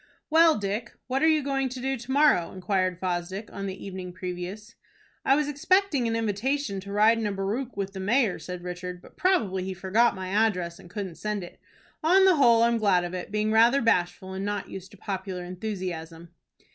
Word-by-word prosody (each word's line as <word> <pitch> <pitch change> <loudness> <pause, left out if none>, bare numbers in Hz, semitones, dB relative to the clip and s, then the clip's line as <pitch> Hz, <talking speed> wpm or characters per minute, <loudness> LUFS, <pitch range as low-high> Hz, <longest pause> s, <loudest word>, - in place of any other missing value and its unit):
"Well, 325 0 +6
Dick, 210 +3 -3
what 265 +1 -1
are 320 - +5
you 310 -2 +3
going 270 -1 0
to 255 +1 -7
do 270 +2 -1
to 245 +1 -7
morrow?" 280 - +4
inquired 185 -1 -1
Fosdick, 185 +3 -3
on 195 0 -4
the 190 0 -7
evening 185 -2 -6
previous. 185 +4 -6 0.5
"I 270 - +4
was 300 0 +1
expecting 295 -2 +2
an 225 - 0
invitation 225 +1 -1
to 200 +1 -9
ride 215 +3 +4
in 220 - -1
a - - -1
barouche 210 +7 -3
with 195 -1 -3
the 190 - -6
mayor," 215 +1 +1
said 175 +2 -7
Richard; 180 0 -6
"but - - -17
probably 215 - +1
he 190 0 -4
forgot 205 +6 +2
my 185 -1 -5
address 190 -5 0
and 175 - -14
couldn't 185 -3 -6
send 210 -2 -2
it. 175 - -11 0.4
On 375 +4 +5
the 370 -4 +5
whole 235 -4 +5
I'm 235 0 +3
glad 195 -4 +3
of 175 0 -5
it, 180 +2 -5
being 215 0 0
rather 230 +5 +5
bashful 190 -4 0
and 190 +1 -4
not 205 0 -3
used 190 0 -8
to 205 - -16
popular 190 -1 -5
enthusiasm." 175 -3 -6
200 Hz, 205 wpm, -27 LUFS, 185-240 Hz, 0.5 s, Well